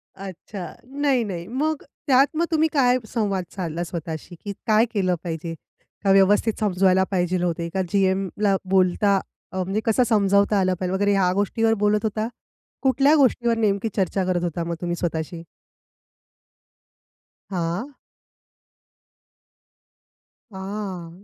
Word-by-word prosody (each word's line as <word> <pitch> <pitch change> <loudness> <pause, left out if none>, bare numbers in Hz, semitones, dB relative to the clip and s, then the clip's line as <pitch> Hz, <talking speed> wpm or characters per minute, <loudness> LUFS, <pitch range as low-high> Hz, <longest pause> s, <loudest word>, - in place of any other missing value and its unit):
अच्छा, 190 0 -8 0.3
नाही, 275 -4 +1
नाही. 180 -4 -5
मग 295 +5 -1 0.2
त्यात 270 +1 +5
मग 340 - +2
तुम्ही 320 0 +3
काय 255 -3 +4 0.2
संवाद 200 -5 0
साधला 170 -2 -3
स्वतःशी, 165 0 -6
की 200 - -3
काय 220 +2 +5
केलं 185 -3 +1
पाहिजे, 165 -1 -4 0.5
का 195 - +3
व्यवस्थित 205 +3 +4
समजवायला 190 -2 +3
पाहिजे 180 -1 +1
होते, 170 -1 -1
का 190 - 0
जीएमला 195 +1 +1
बोलता 190 +1 +3 0.3
अ, 190 - -6
म्हणजे 195 +4 -1
कसं 230 +3 +3
समजावता 200 -1 +3
आलं 185 -1 +2
पाहिजे 185 0 -2
वगैरे 205 +1 +2
ह्या 185 -2 +3
गोष्टीवर 225 +2 +1
बोलत 210 +1 +2
होता. 215 +1 -1 0.5
कुठल्या 275 +3 +4
गोष्टीवर 240 -4 +3
नेमकी 210 0 +1
चर्चा 190 0 0
करत 180 -1 0
होता 170 0 -2
मग 170 0 -3
तुम्ही 175 0 -1
स्वतःशी? 165 0 -3 2.1
हां. 180 +9 -2 2.6
आह! 190 -3 -5
195 Hz, 125 wpm, -23 LUFS, 180-220 Hz, 2.6 s, त्यात